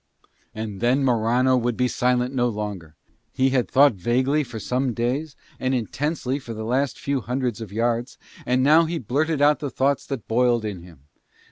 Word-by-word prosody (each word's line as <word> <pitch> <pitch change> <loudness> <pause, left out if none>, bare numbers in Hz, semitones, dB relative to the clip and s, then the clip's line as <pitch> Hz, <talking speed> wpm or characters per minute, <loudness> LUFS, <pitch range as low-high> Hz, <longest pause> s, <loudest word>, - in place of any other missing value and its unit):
And 110 -2 -6
then 130 +3 +2
Morano 125 +2 +2
would 120 -2 0
be 125 - +2
silent 125 +1 0
no 125 -2 +1
longer. 100 -8 -6 0.4
He 130 0 +1
had 130 -2 +1
thought 140 -1 +5
vaguely 130 - +1
for 120 -4 -8
some 125 +2 -1
days 135 +6 -2 0.2
and 130 0 0
intensely 135 +3 -2
for 120 -4 -8
the 110 0 -5
last 130 +1 0
few 140 -2 -2
hundreds 125 -2 -2
yards, 115 +3 -2 0.3
and 125 +1 +1
now 155 +4 +6
he 165 +1 -3
blurted 145 +4 0
out 150 +1 +4
the 145 - -3
thoughts 135 +1 0
that 135 -6 -5
boiled 120 -1 +2
in 100 -5 -5
him. 85 -5 -15
125 Hz, 175 wpm, -23 LUFS, 115-135 Hz, 0.4 s, now